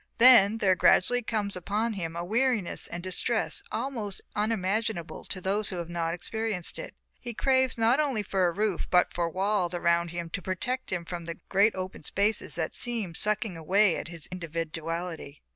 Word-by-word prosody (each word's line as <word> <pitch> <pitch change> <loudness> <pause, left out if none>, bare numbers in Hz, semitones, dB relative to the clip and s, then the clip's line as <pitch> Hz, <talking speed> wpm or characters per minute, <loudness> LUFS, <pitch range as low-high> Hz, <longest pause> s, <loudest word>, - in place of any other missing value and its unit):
Then 230 -4 +8
there 195 -4 +4
gradually 245 +6 +4
comes 215 -3 -2
upon 210 +5 -1
him 165 -5 -4
a 170 +1 -3
weariness 230 -2 0
and 175 0 -6
distress 185 -1 -1
almost 225 -8 -3 0.2
unimaginable 210 -3 -1
to 190 - -5
those 200 +3 0
who 185 - -4
have 170 -1 -5
not 165 -1 -1
experienced 215 0 -3
it. - - -7 0.2
He 240 -2 -7
craves 260 -1 +2
not 230 +5 +3
only 270 -8 +1
for 190 -2 +1
a - - +1
roof 200 -1 -1
but 180 -1 +3
for 170 -1 0
walls 185 0 0
around 170 0 +2
him 170 0 -5
to 185 - -3
protect 245 +9 -3
him 175 -2 -2
from 170 0 -6
the 170 0 -5
great 200 +3 +4
open 185 0 -5
spaces 200 +7 0
that 160 -2 -2
seem 230 -8 -3
sucking 210 +1 -1
away 185 +4 +2
his 165 -2 -8
individuality. 165 -2 -5
190 Hz, 175 wpm, -28 LUFS, 170-220 Hz, 0.2 s, Then